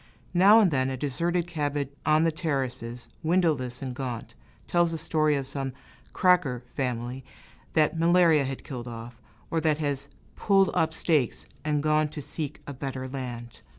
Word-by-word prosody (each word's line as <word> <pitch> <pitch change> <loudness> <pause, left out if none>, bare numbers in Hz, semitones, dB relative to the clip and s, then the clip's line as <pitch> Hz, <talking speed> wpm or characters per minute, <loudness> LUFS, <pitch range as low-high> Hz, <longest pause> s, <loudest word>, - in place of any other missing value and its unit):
Now 195 +5 +7
and 200 -6 +4
then, 130 -2 +1
a 130 - -3
deserted 170 +6 0
cabin 145 -4 -2 0.2
on 155 +1 +5
the 165 - +3
terraces, 130 -7 -3
windowless 155 -8 +1
and 130 -2 -4
gaunt, 125 -3 -5 0.3
tells 175 -1 +2
the 165 - -2
story 155 -1 +2
of 135 -2 -3
some 135 -1 -3 0.4
"cracker" 175 - +2
family 125 0 -3 0.5
that 160 +1 +2
malaria 165 -3 +5
had 135 0 -5
killed 125 -2 -6
off, 115 0 -8 0.3
or 165 - +1
that 155 -2 +2
has 140 -2 -2 0.3
"pulled 195 -2 +3
up 160 0 +1
stakes" 150 -9 +1 0.2
and 150 -1 0
gone 155 0 +3
to 150 +1 -8
seek 150 0 -5
a 140 - -6
better 130 -1 -5
land. 125 -3 -6
145 Hz, 160 wpm, -27 LUFS, 130-165 Hz, 0.5 s, Now